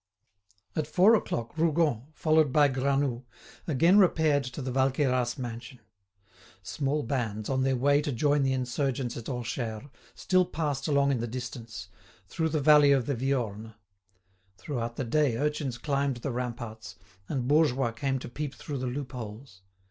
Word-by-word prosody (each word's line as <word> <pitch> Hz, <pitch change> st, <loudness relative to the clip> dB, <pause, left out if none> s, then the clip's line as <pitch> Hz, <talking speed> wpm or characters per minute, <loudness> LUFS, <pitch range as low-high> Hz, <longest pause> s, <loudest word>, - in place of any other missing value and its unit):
At 155 Hz, -2 st, -1 dB
four 185 Hz, +8 st, +5 dB
o'clock 120 Hz, -, -1 dB
Rougon, 155 Hz, -6 st, +1 dB
followed 155 Hz, -3 st, +3 dB
by 145 Hz, +1 st, +5 dB
Granoux, 135 Hz, -1 st, 0 dB, 0.4 s
again 165 Hz, +6 st, +4 dB
repaired 160 Hz, -6 st, +3 dB
to 125 Hz, +4 st, -7 dB
the 130 Hz, -2 st, -3 dB
Valqueyras 130 Hz, -1 st, +1 dB
mansion. 120 Hz, +1 st, -7 dB, 0.9 s
Small 145 Hz, +8 st, -1 dB
bands, 115 Hz, -4 st, -3 dB
on 130 Hz, 0 st, +1 dB
their 130 Hz, 0 st, +2 dB
way 140 Hz, +3 st, +3 dB
to 145 Hz, -, -2 dB
join 145 Hz, +3 st, +2 dB
the 135 Hz, -1 st, +1 dB
insurgents 130 Hz, -1 st, -2 dB
at 115 Hz, -, -7 dB
Orcheres, 120 Hz, 0 st, -4 dB, 0.2 s
still 185 Hz, -1 st, +2 dB
passed 150 Hz, -3 st, -2 dB
along 140 Hz, -2 st, +3 dB
in 130 Hz, -, 0 dB
the 120 Hz, -, -2 dB
distance, 115 Hz, -3 st, -7 dB, 0.4 s
through 160 Hz, -2 st, -1 dB
the 155 Hz, 0 st, 0 dB
valley 150 Hz, 0 st, +6 dB
of 135 Hz, -4 st, +3 dB
the 140 Hz, -, -1 dB
Viorne. 115 Hz, -4 st, -2 dB, 0.8 s
Throughout 120 Hz, -5 st, -4 dB
the 135 Hz, -, -2 dB
day 130 Hz, -1 st, +1 dB
urchins 145 Hz, -2 st, -2 dB
climbed 140 Hz, -2 st, -1 dB
the 130 Hz, +3 st, -4 dB
ramparts, 115 Hz, -4 st, -5 dB, 0.3 s
and 130 Hz, -4 st, -2 dB
bourgeois 135 Hz, -5 st, +3 dB
came 135 Hz, +4 st, -2 dB
to 130 Hz, -, -7 dB
peep 145 Hz, +3 st, -5 dB
through 140 Hz, -3 st, -6 dB
the 130 Hz, -, -3 dB
loopholes. 120 Hz, -5 st, -7 dB
135 Hz, 155 wpm, -28 LUFS, 120-145 Hz, 0.9 s, valley